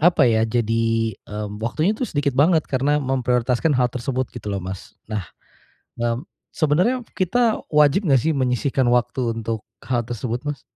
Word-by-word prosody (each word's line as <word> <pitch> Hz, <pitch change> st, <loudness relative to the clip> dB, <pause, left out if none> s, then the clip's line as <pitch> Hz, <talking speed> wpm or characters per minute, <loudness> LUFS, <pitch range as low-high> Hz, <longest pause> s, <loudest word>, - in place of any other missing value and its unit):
apa 165 Hz, -2 st, +5 dB
ya? 110 Hz, -1 st, +3 dB
Jadi, 115 Hz, -1 st, +1 dB
mmm, 105 Hz, 0 st, -5 dB
waktunya 155 Hz, -, +1 dB
tuh 255 Hz, -, -1 dB
sedikit 145 Hz, -1 st, 0 dB
banget 160 Hz, +2 st, +4 dB
karena 140 Hz, +3 st, +1 dB
memprioritaskan 125 Hz, +1 st, +1 dB
hal 125 Hz, -1 st, +3 dB
tersebut 130 Hz, +1 st, -2 dB
gitu 115 Hz, -3 st, -8 dB
loh 100 Hz, -, -2 dB
Mas. 95 Hz, +1 st, -7 dB, 0.2 s
Nah, 105 Hz, -3 st, -2 dB, 0.8 s
mmm, 120 Hz, +3 st, -1 dB, 0.3 s
sebenarnya 175 Hz, -, +2 dB, 0.2 s
kita 225 Hz, +5 st, +2 dB
wajib 150 Hz, +6 st, +4 dB
enggak 135 Hz, -4 st, +4 dB
sih 160 Hz, -, +3 dB
menyisihkan 130 Hz, 0 st, +1 dB
waktu 120 Hz, -1 st, +1 dB
untuk 110 Hz, -1 st, -3 dB, 0.2 s
hal 120 Hz, -2 st, 0 dB
tersebut 120 Hz, 0 st, -3 dB
Mas? 145 Hz, -3 st, -3 dB
125 Hz, 155 wpm, -22 LUFS, 115-150 Hz, 0.8 s, apa